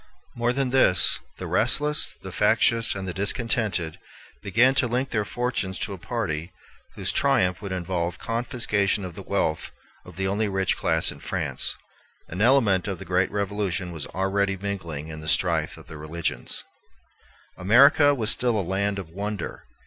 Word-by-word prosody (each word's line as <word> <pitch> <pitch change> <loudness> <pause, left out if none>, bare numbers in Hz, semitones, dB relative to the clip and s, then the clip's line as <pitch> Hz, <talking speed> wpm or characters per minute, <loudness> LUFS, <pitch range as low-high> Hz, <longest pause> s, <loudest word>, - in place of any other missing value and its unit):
More 120 0 +1
than 135 0 -1
this, 125 -9 +4 0.2
the - - -6
restless, 150 0 +2
the - - -7
factious, 115 -1 +3
and 95 -1 -5
the 90 - -3
discontented, 100 -4 0 0.4
began 115 +7 +3
to 130 -2 +2
link 125 +3 -1
their 110 -3 -1
fortunes 120 -6 -2
to 105 - -3
a 95 - -8
party 90 -5 -3 0.4
whose - - -1
triumph 90 0 +2
would 100 -2 -6
involve 90 -2 -2
confiscation 115 -4 0
of 90 - -7
the - - -8
wealth 80 -1 -1 0.3
of 90 - -13
the 95 +1 -1
only 105 +3 0
rich 95 -1 0
class - - +1
in - - -11
France. - - -3 0.5
An 90 +4 -5
element 115 -7 +4
of 95 -2 -3
the 95 - -9
great 90 +1 +1
revolution 100 -3 -2
was 80 -4 -5
already 95 +1 0
mingling 85 -6 -5
in 80 -1 -7
the 75 0 -5
strife - - +1
of - - -14
religions. 80 -4 -4 0.9
America 140 - +5
was 115 -3 +1
still 120 -2 +2
a - - -1
land 100 +3 -1
of 90 -5 -7
wonder. 100 +3 -5
100 Hz, 165 wpm, -25 LUFS, 90-115 Hz, 0.9 s, America